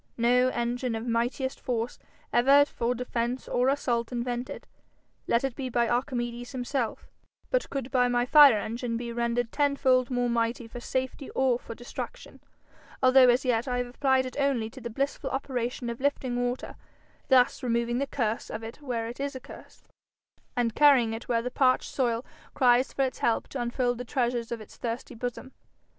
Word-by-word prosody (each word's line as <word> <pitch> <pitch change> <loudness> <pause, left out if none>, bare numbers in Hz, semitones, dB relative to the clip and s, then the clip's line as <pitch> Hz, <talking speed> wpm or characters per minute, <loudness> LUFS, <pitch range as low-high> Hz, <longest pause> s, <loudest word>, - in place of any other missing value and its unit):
No 245 +2 +4
engine 240 0 -2
of 225 +1 -4
mightiest 245 +3 -1
force 240 -2 -3 0.3
ever 275 +4 +6
for 245 -3 -2
defence 245 0 -3
or 250 +2 +2
assault 240 -4 0
invented, 245 +1 -4 0.6
let 235 - +2
it 270 -3 -2
be 265 -2 -4
by 235 -1 +1
Archimedes 240 0 -2
himself, 250 -2 -2 0.5
but - - +1
could 270 -2 -4
by 250 -2 +3
my 245 0 +1
fire 280 -3 +8
engine 230 +2 -3
be 235 0 -5
rendered 235 0 -1
tenfold 270 -3 +2
more 245 -1 0
mighty 235 0 -1
for 245 - -8
safety 260 +2 -3
or 260 -2 +2
for 230 - -9
destruction, 245 - -8 0.6
although 255 0 +7
as 245 +3 +3
yet 240 0 +1
I 250 -1 -1
have 245 - 0
applied 260 +1 +1
it 255 - -7
only 255 -6 0
to 260 - -11
the 235 - -5
blissful 275 +3 -2
operation 250 -2 -3
of 235 +1 -5
lifting 270 -3 0
water, 245 +1 -3 0.5
thus 255 0 +4
removing 235 -1 0
the 280 - -1
curse 230 -5 -2
of 220 - -5
it 230 +6 -9
where 240 -5 -3
it 240 +3 -8
is 280 0 -3
a - - -5
curse, - - -14 0.7
and 235 -2 +1
carrying 265 -6 +5
it 225 - -7
where 230 -2 +1
the 250 - -3
parched 255 0 +2
soil 240 -2 0 0.3
cries 250 0 +4
for 275 - 0
its 260 -2 -2
help 230 - 0
to 265 - -4
unfold 245 0 -1
the - - -3
treasures 240 -2 -1
of 235 -2 -4
its 215 - -13
thirsty 235 +2 -4
bosom. 245 +2 -5
245 Hz, 180 wpm, -28 LUFS, 235-260 Hz, 0.7 s, fire